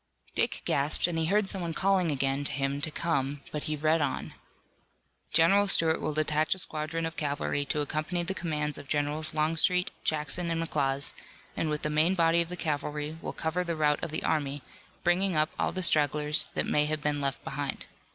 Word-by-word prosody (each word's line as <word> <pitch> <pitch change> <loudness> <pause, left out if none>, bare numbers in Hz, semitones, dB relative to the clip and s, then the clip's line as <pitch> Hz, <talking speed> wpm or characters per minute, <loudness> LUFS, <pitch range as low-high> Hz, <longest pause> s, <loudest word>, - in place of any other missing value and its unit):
Dick - - -1
gasped 140 +2 +1
and 175 -1 -1
he 160 -1 0
heard 205 +2 +2
someone 175 -4 -3
calling 190 -1 +2
again 140 -1 0
to - - 0
him 140 0 -1
to 150 - 0
come, 145 -4 -1
but 150 - -4
he 155 - -1
read 155 +2 +2
on: 145 - -2 1.0
General 190 +6 +4
Stuart 160 -4 +4
will 155 - -2
detach 155 +2 +1
a - - -13
squadron 160 -1 -1
of 165 0 -4
cavalry 145 -1 -1
to 150 +1 -1
accompany 155 +4 -2
the 185 +3 -2
commands 150 -5 -3
of 140 - -11
Generals 150 +2 -1
Longstreet, 165 +4 +3
Jackson 155 +3 +1
and 165 0 -1
McLaws, 140 -4 0 0.4
and 160 - -1
with 150 0 -3
the 150 - -1
main 160 +5 +3
body 165 -1 +3
of 170 - -3
the 180 - -5
cavalry 150 0 -3
will - - -4
cover 165 +3 -2
the 170 -2 -2
route 150 -1 +1
of - - -2
the 155 - -3
army, 145 -2 -1 0.4
bringing 180 +1 +2
up 155 +1 +2
all - - +1
the 185 - -3
stragglers 150 -2 +3
that - - 0
may 150 0 +2
have 155 -1 -2
been 145 -1 0
left 135 -1 -2
behind. 140 -1 -4
155 Hz, 200 wpm, -29 LUFS, 145-165 Hz, 1.0 s, General